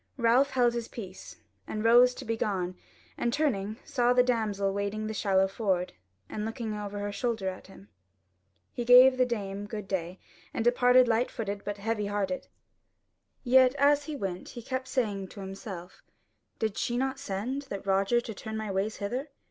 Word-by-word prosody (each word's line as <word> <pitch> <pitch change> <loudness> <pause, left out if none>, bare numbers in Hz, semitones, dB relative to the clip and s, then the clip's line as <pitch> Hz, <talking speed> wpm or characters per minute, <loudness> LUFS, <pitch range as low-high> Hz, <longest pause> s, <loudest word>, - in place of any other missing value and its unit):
Ralph 245 +3 +4
held 245 -3 +2
his 235 -1 -3
peace, 190 -5 -9 0.3
and 215 0 -3
rose 245 +2 +6
to 265 - -8
be 230 0 -1
gone 185 -5 -2 0.4
and 240 - +1
turning 220 -8 0
saw 245 -4 +2
the 250 0 +5
damsel 210 -5 0
wading 200 +2 -2
the 220 - -3
shallow 195 -2 +2
ford, 190 -3 -1 0.3
and 210 - -4
looking 225 0 -4
over 205 -1 -5
her 205 0 -3
shoulder 220 -2 -2
at 185 - -9
him. 100 - -15 0.9
He 240 - -3
gave 250 +2 +8
the 255 -1 +3
dame 205 -3 -4
good 210 -2 -6
day, 185 -1 -3 0.4
and 225 - -1
departed 245 +1 +5
light 235 +2 +2
foot 205 -4 -4
but 205 0 -4
heavy 210 0 -2
hearted. 200 -3 -2 1.0
Yet 255 +1 +5
as 285 +1 +3
he 305 - -5
went, 190 -8 -4
he 240 - -9
kept 260 +1 -3
saying 205 -8 -1
to 200 - -12
himself: 190 -2 -8 0.6
"Did 220 -3 -2
she 240 - -1
not 265 +1 -1
send 260 +4 -4
that 200 -1 -5
Roger 195 +4 +3
to 225 - -7
turn 220 +2 -6
my 215 -2 -3
ways 195 +3 -1
hither? 245 +8 -3
220 Hz, 180 wpm, -29 LUFS, 195-245 Hz, 1.0 s, gave